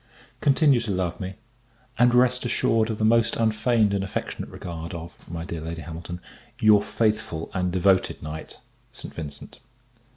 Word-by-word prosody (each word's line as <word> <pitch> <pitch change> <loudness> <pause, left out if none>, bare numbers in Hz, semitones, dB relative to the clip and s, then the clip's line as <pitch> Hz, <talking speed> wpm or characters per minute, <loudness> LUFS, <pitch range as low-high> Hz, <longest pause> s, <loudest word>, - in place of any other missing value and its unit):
Continue 140 -2 +4
to 115 -2 -4
love 90 -3 -1
me; 95 0 -5 0.6
and 120 0 +5
rest 125 0 +4
assured 115 -2 +2
of 110 - -2
the 110 - +1
most 115 +1 +4
unfeigned 110 -1 +2
and 100 -1 0
affectionate 95 - -4
regard 85 0 -6
of, 85 +1 -10
my 85 0 -5
dear 85 -2 -5
Lady 80 +1 -5
Hamilton, 85 +1 -7 0.4
your 105 -3 +6
faithful 105 -9 -1
and 90 -1 0
devoted 95 +1 +2
Knight, 75 +1 -7 0.3
ST. - - -9
VINCENT. 75 -3 -8
100 Hz, 155 wpm, -25 LUFS, 85-115 Hz, 0.6 s, your